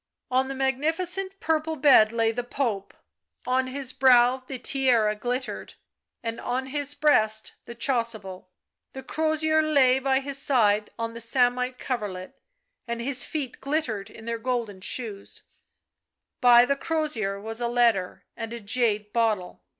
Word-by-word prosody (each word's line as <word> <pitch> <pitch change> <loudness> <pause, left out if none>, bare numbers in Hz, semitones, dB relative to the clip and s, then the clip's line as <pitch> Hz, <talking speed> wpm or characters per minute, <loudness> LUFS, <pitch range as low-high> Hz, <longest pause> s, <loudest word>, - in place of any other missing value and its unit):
On 260 +1 +2
the 270 - -5
magnificent 335 +9 -1
purple 320 0 -1
bed 265 -7 +5
lay 230 -1 +1
the 245 +2 -4
Pope; 235 -6 -3 0.5
on 255 +1 +1
his 260 0 -2
brow 250 -1 +5
the 260 0 -8
tiara 245 -6 +1
glittered, 245 +4 -4 0.5
and 230 0 -4
on 255 +2 -2
his 285 +1 -1
breast 220 -8 +2
the 235 - -9
chasuble; 225 -7 -2 0.4
the 265 - -8
crozier 315 +2 +1
lay 275 -4 +3
by 265 0 +1
his 275 0 -2
side 215 -7 +2
on 230 0 -4
the 230 - -6
samite 250 +1 +1
coverlet, 205 -9 -5 0.5
and 235 0 -3
his 255 +2 +2
feet 280 -6 -5
glittered 275 -9 -2
in 225 - -13
their 230 0 -3
golden 225 -5 -3
shoes; 205 -2 -4 1.0
by 245 -1 +7
the 280 - +1
crozier 275 -11 -2
was 225 +3 -6
a 240 - 0
letter 235 -6 +1
and 225 0 -6
a 235 - -6
jade 210 -1 -1
bottle. 220 -6 -1
245 Hz, 145 wpm, -25 LUFS, 225-270 Hz, 1.0 s, by